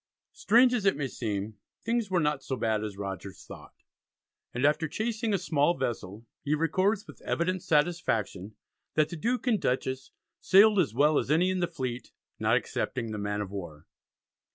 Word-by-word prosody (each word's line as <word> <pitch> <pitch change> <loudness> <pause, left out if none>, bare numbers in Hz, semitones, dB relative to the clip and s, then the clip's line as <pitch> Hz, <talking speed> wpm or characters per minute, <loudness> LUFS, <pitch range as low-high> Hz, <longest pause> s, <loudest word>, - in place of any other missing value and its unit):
Strange 245 +3 +4
as 240 -5 0
it 195 - +3
may 145 - -1
seem 105 -3 -4 0.3
things 230 -2 0
were 185 -2 +2
not 150 -3 0
so 135 - -3
bad 110 -3 0
as 105 -2 -5
Rogers 100 -1 -6
thought, - - -12 0.8
and 125 +3 -1
after 150 +2 +2
chasing 220 +4 -2
a 200 - +2
small 165 -2 +1
vessel 110 -1 -4 0.2
he 150 +2 +1
records 185 +7 +1
with - - -14
evident 185 +2 -1
satisfaction, 115 - 0 0.4
that 155 -1 +3
the 175 - -6
Duke 240 +11 -1
and 225 -6 +2
Dutchess 130 +1 -1 0.3
"sailed 205 +2 +6
as 145 -10 +1
well 150 +3 +4
as - - -4
any 175 +5 +3
in 185 - -1
the 175 - +1
fleet, 130 -7 -5 0.3
not - - +3
excepting 115 -4 -3
the 105 - -4
man 105 0 -2
of 100 -2 -5
war." 85 -7 -7
150 Hz, 175 wpm, -28 LUFS, 110-185 Hz, 0.8 s, sailed